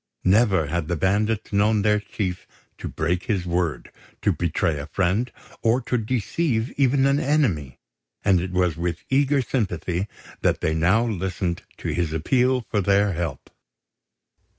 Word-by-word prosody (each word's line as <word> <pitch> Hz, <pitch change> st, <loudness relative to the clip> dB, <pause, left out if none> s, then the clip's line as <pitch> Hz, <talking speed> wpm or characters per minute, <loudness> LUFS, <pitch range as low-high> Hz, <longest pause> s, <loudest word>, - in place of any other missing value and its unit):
Never 95 Hz, -3 st, +4 dB
had 80 Hz, +1 st, -2 dB
the 85 Hz, -, 0 dB
bandits 105 Hz, +6 st, 0 dB
known 105 Hz, +1 st, +3 dB
their 105 Hz, 0 st, +3 dB
chief 100 Hz, -3 st, -4 dB, 0.3 s
to -, -, -5 dB
break 90 Hz, +1 st, -1 dB
his 100 Hz, -7 st, -1 dB
word, 85 Hz, -2 st, -1 dB, 0.3 s
to -, -, +4 dB
betray 85 Hz, -2 st, 0 dB
a 70 Hz, -, -6 dB
friend, 95 Hz, +9 st, 0 dB, 0.3 s
or 115 Hz, +2 st, +3 dB
to 125 Hz, -, -2 dB
deceive 120 Hz, -, -1 dB
even 135 Hz, 0 st, +2 dB
an 140 Hz, +1 st, +3 dB
enemy; 125 Hz, -, 0 dB, 0.5 s
and 95 Hz, -3 st, +4 dB
it 90 Hz, -, -3 dB
was 90 Hz, -2 st, +1 dB
with 85 Hz, 0 st, -3 dB
eager 140 Hz, 0 st, +3 dB
sympathy 95 Hz, -6 st, -2 dB, 0.3 s
that -, -, +2 dB
they 80 Hz, -, 0 dB
now 90 Hz, +9 st, +3 dB
listened 95 Hz, -4 st, -2 dB, 0.2 s
to -, -, -4 dB
his 80 Hz, 0 st, -1 dB
appeal 125 Hz, -, +2 dB
for 105 Hz, -2 st, -1 dB
their 100 Hz, +1 st, +3 dB
help. 85 Hz, -5 st, -4 dB
100 Hz, 150 wpm, -24 LUFS, 85-115 Hz, 0.5 s, Never